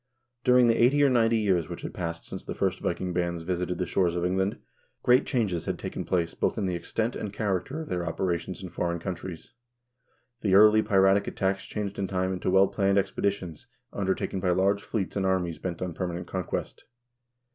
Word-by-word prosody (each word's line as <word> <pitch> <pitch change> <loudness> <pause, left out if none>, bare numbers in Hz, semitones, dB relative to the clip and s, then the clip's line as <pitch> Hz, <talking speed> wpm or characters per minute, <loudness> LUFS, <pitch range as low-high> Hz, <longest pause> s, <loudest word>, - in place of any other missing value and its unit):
During 125 0 +6
the 115 0 +4
eighty 145 +4 +5
or 140 - +5
ninety 115 -2 +3
years 95 -6 +1
which - - -7
had - - -5
passed 85 -1 -4
since - - -7
the - - -6
first - - 0
Viking 90 -1 -2
bands 85 -1 -1
visited 90 0 -2
the 90 - -1
shores 90 0 +1
of 90 0 0
England, 95 +2 0 0.5
great 125 +2 +4
changes 100 - 0
had - - -2
taken - - -5
place 85 -2 0
both - - -1
in 105 - 0
the 90 - -1
extent 110 +7 -2
and 105 - -4
character 105 - -2
of 155 - -8
their 90 -1 -1
operations 85 +1 -2
in 90 - -6
foreign 85 0 -2
countries. 85 -1 -6 0.9
The 95 -3 +3
early 105 +2 +7
piratic 95 -1 +3
attacks 95 0 -1
changed 100 -2 -4
in 95 - -1
time 95 0 -1
into 90 - -2
well 95 +1 +5
planned 100 0 +1
expeditions 95 -4 -1 0.3
undertaken 95 0 -1
by 90 -1 0
large 95 +3 +2
fleets 100 -4 -3
and 100 - 0
armies 95 -3 0
bent 90 -1 -4
on 90 -2 -4
permanent 90 0 -4
conquest. 95 -2 -4
95 Hz, 195 wpm, -27 LUFS, 90-100 Hz, 0.9 s, early